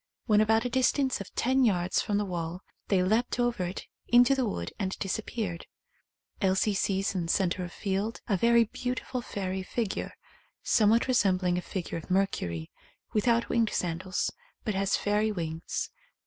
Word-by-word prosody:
When 210 -1 +4
about 220 +2 +3
a - - 0
distance 260 -1 +2
of 200 - -9
ten 260 +2 +2
yards 185 -5 +2
from 205 - 0
the 205 - 0
wall 175 -1 -4 0.3
they 190 -3 +3
leapt 225 +6 +1
over 240 -6 +1
it 180 +2 -5 0.2
into 245 +2 +6
the 260 -3 +1
wood 85 - -4
and 190 -2 -2
disappeared. 195 -3 -3 0.7
Elsie 190 +2 +2
sees 195 0 0
in 175 -3 -2
centre 185 0 +1
of 175 - -6
field 200 +4 -2
a 205 - +2
very 235 +4 +5
beautiful 250 +2 -4
fairy 190 -4 -3
figure, 210 +2 -3 0.5
somewhat 225 +3 +4
resembling 185 -7 +2
a - - -5
figure 175 -2 -4
of 160 - -13
Mercury, 90 - -1 0.4
without 230 +2 +2
winged 230 -2 +2
sandals, 180 +1 -1 0.3
but 215 - 0
has 195 0 +1
fairy 210 +1 +1
wings. 165 -4 -3
200 Hz, 160 wpm, -29 LUFS, 185-230 Hz, 0.7 s, into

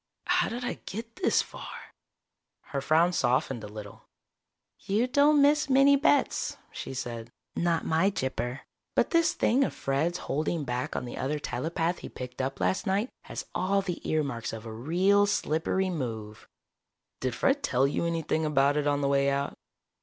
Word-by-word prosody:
How - - +2
did 245 +2 -4
I - - -3
get 230 +3 -6
this 370 - +3
far?" - - -10 0.7
Her 140 - -4
frown 165 +5 +3
softened 125 -5 +1
a - - -5
little. 105 -1 -10 0.7
"You 210 +5 +1
don't 285 +3 +4
miss 295 0 +3
many 275 +1 +6
bets," 285 0 +2
she 135 - -6
said. 120 -2 -5 0.3
"Not 170 -1 +1
my 165 +5 +3
Gypper. 130 -6 -3 0.3
But - - +2
this 335 -1 +3
thing 260 +4 +3
of - - -2
Fred's 155 +6 0
holding 155 +1 -2
back 125 -1 -3
on - - -2
the 120 - -7
other 145 +3 -1
telepath 165 +3 -2
he - - -8
picked 125 0 -6
up 135 +1 -3
last 190 - 0
night 200 +6 +1 0.2
has - - -6
all 195 +2 +1
the 180 -3 -4
earmarks 140 -9 -1
of 115 0 -7
a 110 - -6
real 185 - +3
slippery 185 +1 0
move." 110 -9 -5 0.7
"Did 130 -2 -2
Fred 280 +1 +2
tell 130 - +2
you 140 - 0
anything 165 -1 0
about 145 -1 +3
it 150 -1 +1
on 145 0 +1
the 140 - +1
way 140 0 +3
out?" 140 0 -1
155 Hz, 170 wpm, -28 LUFS, 130-200 Hz, 0.7 s, many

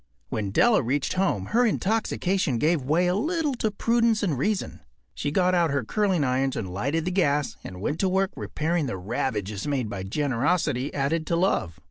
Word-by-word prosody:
When 105 -3 -2
Della 225 - +4
reached 130 +3 -1
home 185 - 0
her 245 +2 +5
intoxication 195 - 0
gave 155 +4 +2
way 155 +7 +2
a 180 - +2
little 305 - 0
to 220 - 0
prudence 230 +1 +1
and 170 -8 +1
reason. 200 - -1 0.3
She - - -2
got 180 +4 +2
out 170 -2 +3
her 140 -2 0
curling 190 - +1
irons 130 0 0
and 95 -5 -4
lighted 140 - -1
the 180 - -1
gas 145 - +1
and 90 0 -8
went 150 +9 -2
to 190 - +2
work 190 +1 +1
repairing 160 -1 -1
the 115 - -3
ravages 105 +1 -3
made 130 -7 -1
by 100 - -4
generosity 135 - 0
added 155 +3 -1
to 170 - +1
love. 170 - 0
155 Hz, 185 wpm, -25 LUFS, 125-190 Hz, 0.3 s, her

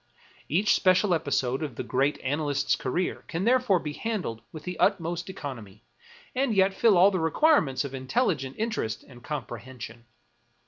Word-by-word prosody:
Each 190 +8 +3
special 185 +1 +3
episode 135 -4 0
of 145 -6 -4
the - - -4
great 135 +3 0
analyst's 145 +1 0
career 155 +8 -2
can 170 +2 -3
therefore 245 -4 +3
be 150 -3 -4
handled 185 - -3
with 155 -2 -9
the 180 +1 -6
utmost 175 -2 +1
economy, 115 - -8 0.5
and 255 -3 0
yet 190 0 +4
fill 210 -1 +4
all 190 +3 +7
the 185 - -1
requirements 160 - +3
of 140 - -7
intelligent 135 - -1
interest 215 - -2
and 120 -2 -15
comprehension. 120 -3 -7
155 Hz, 150 wpm, -27 LUFS, 130-195 Hz, 0.5 s, all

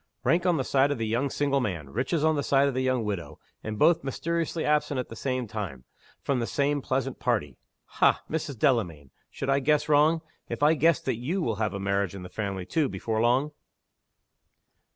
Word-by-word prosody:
Rank 175 +2 +2
on 175 -2 +3
the 135 - 0
side 135 +2 +2
of 145 - -1
the 115 - -2
young 120 +6 0
single 140 0 +1
man; 85 - -3
riches 135 - -1
on 160 0 +3
the 145 - 0
side 140 0 +3
of 140 - -1
the 130 - -1
young 130 -2 +1
widow. 100 -5 -4 0.3
And 110 0 -4
both 165 +7 +4
mysteriously 165 +4 -2
absent 150 -2 +1
at 125 - -4
the 115 - -8
same 130 0 -2
time, 100 - -6 0.4
from 140 -3 0
the 115 - -2
same 145 0 0
pleasant 130 0 -2
party. - - -1 0.3
Ha, - - +2
Mrs. 150 -4 -3
Delamayn! 90 - 0 0.2
should 135 - -3
I 135 - +3
guess 150 +2 +2
wrong, 155 +2 +4 0.3
if - - -3
I 150 +2 +6
guessed 165 +2 +2
that 130 -4 0
you 160 +11 -2
will 110 -6 -1
have 105 -2 -1
a - - -3
marriage 100 -1 -1
in 95 - -7
the 90 - -8
family, 100 -4 -4
too, 155 - 0
before 110 -1 -2
long?" 130 +6 +2
130 Hz, 210 wpm, -27 LUFS, 110-145 Hz, 0.4 s, I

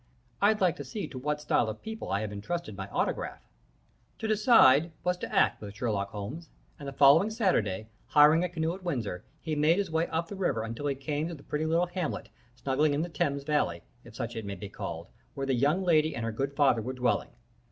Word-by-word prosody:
I'd 210 +1 +3
like 180 -3 +3
to - - -5
see 205 -8 -5
to 130 - -7
what 150 +3 -1
style 120 -6 +1
of 110 - -7
people 220 0 -6
I 100 +1 +1
have 110 -1 -4
intrusted 110 +3 -4
my 95 0 -6
autograph.' - - -2 0.7
"To 220 - -3
decide 205 - +5
was 180 +1 +1
to - - -6
act 115 +3 +2
with 100 -1 -8
Sherlock 100 -3 -1
Holmes, 110 +12 -7 0.3
and 140 - -7
the - - -4
following 145 +9 +6
Saturday, 110 - 0 0.2
hiring 150 +3 +6
a 180 - -1
canoe 165 -1 -1
at 190 - -9
Windsor, 120 - -3 0.2
he 160 -2 -2
made 155 +4 +3
his 200 -4 -1
way 160 +1 +1
up 165 +1 -2
the 200 - -7
river 140 - 0
until 115 +6 -4
he 140 - 0
came 145 +3 -2
to 170 - -6
the 140 - -14
pretty 150 +1 -2
little 165 +2 +2
hamlet, 175 -2 -4 0.3
snuggling 145 +3 +1
in 150 - 0
the 175 - -4
Thames 140 -3 -1
Valley, 140 - 0 0.2
if - - -14
such 120 -1 -4
it 115 - -4
may 100 -1 -5
be 100 +2 -8
called, - - -6 0.3
where 135 - -2
the 135 - +1
young 145 +9 +2
lady 155 -4 +3
and 115 - -3
her 115 - -1
good 135 +5 -3
father 135 -6 +3
were 125 +4 -4
dwelling. 125 -1 0
145 Hz, 225 wpm, -29 LUFS, 115-170 Hz, 0.7 s, following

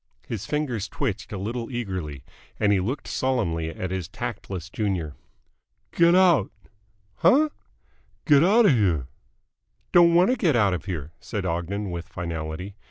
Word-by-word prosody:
His 110 -2 -5
fingers 130 -9 -2
twitched - - -3
a - - -4
little 115 +4 -4
eagerly, 95 - -4 0.4
and 105 -1 +3
he 100 - +3
looked 120 +10 -3
sullenly 85 -12 -1
at 90 +3 -5
his 95 -3 -3
tactless 90 -1 -6
junior. 95 -6 -2 0.8
"Get 170 +1 +5
out!" 175 - +4 0.7
"Huh?" 300 +4 +4 0.8
"Get 145 -1 +6
outa 205 +3 +5
here!" 90 - +2 0.9
"Don't 170 -1 +6
want 180 +7 +5
to - - +2
get 165 - +2
out 105 -5 +3
of 90 - -4
here," 80 -6 -5
said 105 -1 -4
Ogden 90 +3 -2
with 85 0 -5
finality. 85 +2 -5
100 Hz, 145 wpm, -25 LUFS, 85-135 Hz, 0.9 s, Get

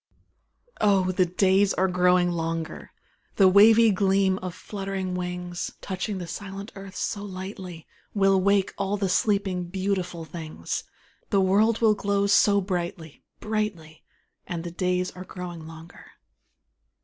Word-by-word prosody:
Oh, 195 -3 +3
the 185 0 +2
days 190 +2 +3
are 190 - +2
growing 180 -1 +3
longer, 165 -1 -4 0.4
The 195 - +6
wavy 220 +4 +7
gleam 195 -1 +2
of 185 -2 -6
fluttering 195 -2 -4
wings, 180 -1 -4
Touching 190 +1 -4
the 180 - -5
silent 195 +3 -7
earth 195 -1 -10
so 200 - -3
lightly, 185 -3 -7 0.3
Will 195 -1 +4
wake 200 0 +2
all 200 +1 0
the 195 -2 -1
sleeping, 195 -2 +1
beautiful 185 -2 -3
things, 155 - -5 0.4
The 200 - +3
world 210 +5 +3
will 220 -2 +5
glow 200 -1 0
so 200 0 +4
brightly 175 -4 -4 0.2
brightly; 205 -8 -3 0.4
And 170 -3 -4
the 175 - -6
days 180 +1 -1
are 185 - -9
growing 175 -3 -8
longer. 165 +1 -12
190 Hz, 135 wpm, -25 LUFS, 180-200 Hz, 0.4 s, wavy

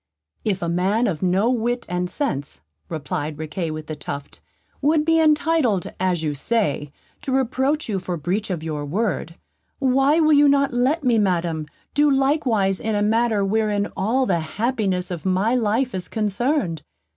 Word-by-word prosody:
"If 195 -4 -1
a - - -1
man 190 +7 +1
of 180 -9 -2
no 190 +6 +2
wit 240 0 -1
and 180 0 -2
sense," 145 - -3 0.3
replied 155 -1 -4
Riquet 160 +2 -4
with 155 0 -5
the 155 - -5
Tuft, 140 - -7 0.4
"would 300 +1 +3
be 325 0 +4
entitled, 305 - +2
as 180 -3 0
you 150 -2 0
say, 145 -4 -1 0.3
to 275 - -4
reproach 265 +3 +1
you 200 -4 -1
for 180 -1 -4
breach 185 +8 -2
of 170 -4 -3
your 155 -2 -3
word, 170 0 -2 0.4
why 270 +3 +3
will 310 -1 +4
you 290 0 +6
not 280 -2 +2
let 265 +6 +1
me, 240 -4 +3
Madam, 170 -5 0 0.3
do 295 +1 +4
likewise 270 -9 +2
in 220 -1 -1
a 205 - +1
matter 220 -1 +2
wherein 210 0 0
all 240 +7 +1
the 180 -7 +1
happiness 190 +1 -1
of 170 -3 -5
my 190 +5 +1
life 240 +2 +1
is 185 -1 -4
concerned? 215 - -1
210 Hz, 170 wpm, -22 LUFS, 175-260 Hz, 0.4 s, you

